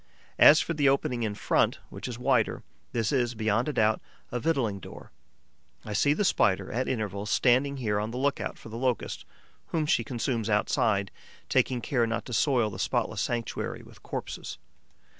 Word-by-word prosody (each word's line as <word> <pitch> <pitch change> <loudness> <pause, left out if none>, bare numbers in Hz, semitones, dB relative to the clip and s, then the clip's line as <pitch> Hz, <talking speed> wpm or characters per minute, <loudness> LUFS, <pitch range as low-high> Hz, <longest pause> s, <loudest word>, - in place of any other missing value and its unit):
As 155 - +9
for 165 - -2
the 145 -3 +3
opening 125 -3 0
in 105 -2 -1
front, - - +1
which - - -6
is 120 -2 -5
wider, 125 -2 +1 0.3
this 115 -3 0
is, 120 -3 +1
beyond 110 +4 +1
a - - -2
doubt, 110 -2 +2 0.3
a 125 - -2
victualling 120 -9 0
door. - - -11 0.7
I 105 - -5
see 145 +8 +3
the 200 +7 0
Spider, 95 - +2
at 125 +3 -1
intervals, 105 -4 -3
standing 135 +4 +3
here 105 -5 0
on 105 +1 -2
the 120 - -5
look 140 +2 0
out - - -4
for - - -12
the 115 +1 -6
Locust, 125 -2 -2 0.4
whom 160 -2 -1
she 135 -5 +2
consumes 115 -2 -2
outside, 105 -1 +1 0.4
taking 125 -2 +2
care 120 -1 +1
not 115 +1 -2
to 125 - -7
soil 120 -2 +2
the 95 - -8
spotless - - -1
sanctuary 120 -1 -3
with - - -17
corpses. - - -6
120 Hz, 180 wpm, -28 LUFS, 110-130 Hz, 0.7 s, As